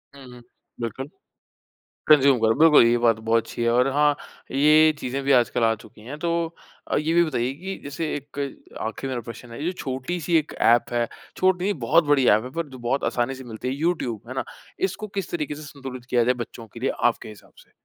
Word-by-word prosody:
हुँ, 140 Hz, -, -12 dB
हुँ। 125 Hz, -, -13 dB, 0.4 s
बिल्कुल। 130 Hz, +5 st, -4 dB, 1.0 s
कंज़्यूम 140 Hz, -4 st, +6 dB
करो, 110 Hz, 0 st, +3 dB
बिल्कुल 155 Hz, -6 st, +7 dB
ये 120 Hz, +1 st, +4 dB
बात 115 Hz, -2 st, +3 dB
बहुत 115 Hz, 0 st, +3 dB
अच्छी -, -, -6 dB
है। 115 Hz, -, +2 dB
और 125 Hz, +3 st, +3 dB
हाँ, 145 Hz, 0 st, +3 dB, 0.4 s
ये 155 Hz, +3 st, +5 dB
चीज़ें 130 Hz, +2 st, -3 dB
भी 140 Hz, -, +3 dB
आजकल 120 Hz, -1 st, +3 dB
आ 115 Hz, -, +3 dB
चुकी 110 Hz, -, -16 dB
हैं। 130 Hz, +7 st, -8 dB
तो 170 Hz, +2 st, -1 dB, 0.7 s
ये 155 Hz, +2 st, 0 dB
भी 170 Hz, 0 st, +5 dB
बताइए 130 Hz, -5 st, -1 dB
कि 190 Hz, +6 st, -6 dB
जैसे 145 Hz, +3 st, -3 dB
1 145 Hz, 0 st, -8 dB, 0.4 s
आखिरी 115 Hz, +4 st, -4 dB
मेरा 125 Hz, -2 st, -3 dB
प्रश्न 115 Hz, +1 st, -10 dB
है, 115 Hz, -, -7 dB
जो 175 Hz, -, 0 dB
छोटी-सी 165 Hz, +3 st, -2 dB
एक 155 Hz, -, -3 dB
एप 120 Hz, +1 st, +4 dB
है, 120 Hz, -1 st, +1 dB, 0.3 s
छोटी 185 Hz, -1 st, +2 dB
नहीं 205 Hz, +1 st, +1 dB
बहुत 165 Hz, +6 st, +5 dB
बड़ी 145 Hz, -3 st, +3 dB
एप 110 Hz, +1 st, +4 dB
है, 125 Hz, -, -7 dB
पर 145 Hz, -3 st, -5 dB
बहुत 125 Hz, +3 st, -1 dB
आसानी 125 Hz, +2 st, 0 dB
से 130 Hz, -, -10 dB
मिलती 120 Hz, +1 st, -6 dB
है। 130 Hz, -, -1 dB
यूट्यूब, 140 Hz, -, -1 dB
है 130 Hz, -, -6 dB
ना। 130 Hz, -, -2 dB, 0.4 s
इसको 190 Hz, +3 st, -7 dB
किस 195 Hz, -3 st, -3 dB
तरीके 150 Hz, -3 st, -3 dB
से 150 Hz, -, -10 dB
संतुलित 135 Hz, -4 st, -9 dB
किया 120 Hz, -2 st, +3 dB
जाए 125 Hz, +2 st, +3 dB
बच्चों 115 Hz, -1 st, -12 dB
के 115 Hz, -, -10 dB
लिए 135 Hz, -, +1 dB
आपके 120 Hz, -2 st, +1 dB
हिसाब 105 Hz, -1 st, -14 dB
से? -, -, -33 dB
135 Hz, 215 wpm, -24 LUFS, 120-155 Hz, 1.0 s, बिल्कुल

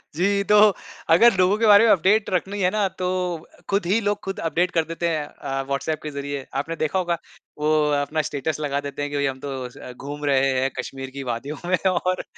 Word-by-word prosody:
जी। 200 Hz, +4 st, +1 dB
तो 210 Hz, -, +7 dB, 0.6 s
अगर 235 Hz, +6 st, +6 dB
लोगों 185 Hz, +3 st, +3 dB
के 225 Hz, -, +1 dB
बारे 210 Hz, +2 st, +8 dB
में 220 Hz, -, +5 dB
अपडेट 200 Hz, +4 st, +3 dB
रखनी 195 Hz, +2 st, -1 dB
है 180 Hz, -, +3 dB
ना 210 Hz, -2 st, +1 dB
तो 180 Hz, -, 0 dB, 0.6 s
खुद 200 Hz, -2 st, +1 dB
ही 200 Hz, +6 st, +2 dB
लोग 205 Hz, 0 st, -1 dB
ख़ुद 195 Hz, 0 st, -4 dB
अपडेट 175 Hz, +3 st, +1 dB
कर 165 Hz, -2 st, +2 dB
देते 170 Hz, +1 st, -2 dB
हैं 155 Hz, -2 st, -1 dB
अ, 135 Hz, -2 st, -4 dB
व्हाट्सऐप 140 Hz, +3 st, -2 dB
के 155 Hz, -, -4 dB
ज़रिए। 140 Hz, -1 st, -5 dB, 0.2 s
आपने 165 Hz, +3 st, -5 dB
देखा 160 Hz, +4 st, 0 dB
होगा 175 Hz, -2 st, 0 dB, 0.4 s
वो 150 Hz, +1 st, +1 dB, 0.3 s
अपना 155 Hz, +2 st, -1 dB
स्टेटस 150 Hz, +2 st, -3 dB
लगा 140 Hz, -2 st, -1 dB
देते 140 Hz, +1 st, -6 dB
हैं 145 Hz, 0 st, -3 dB
कि 145 Hz, -, -2 dB
भाई 140 Hz, -, +1 dB
हम 135 Hz, -1 st, -2 dB
तो 140 Hz, +1 st, -6 dB
अ, 125 Hz, 0 st, -10 dB
घूम 145 Hz, +3 st, -7 dB
रहे 135 Hz, -1 st, +3 dB
हैं 135 Hz, -, +1 dB
कश्मीर 135 Hz, -1 st, -5 dB
की 140 Hz, -, -4 dB
वादियों 135 Hz, +6 st, -5 dB
में 185 Hz, -, +3 dB
और 185 Hz, +1 st, -1 dB
160 Hz, 225 wpm, -23 LUFS, 140-190 Hz, 0.6 s, बारे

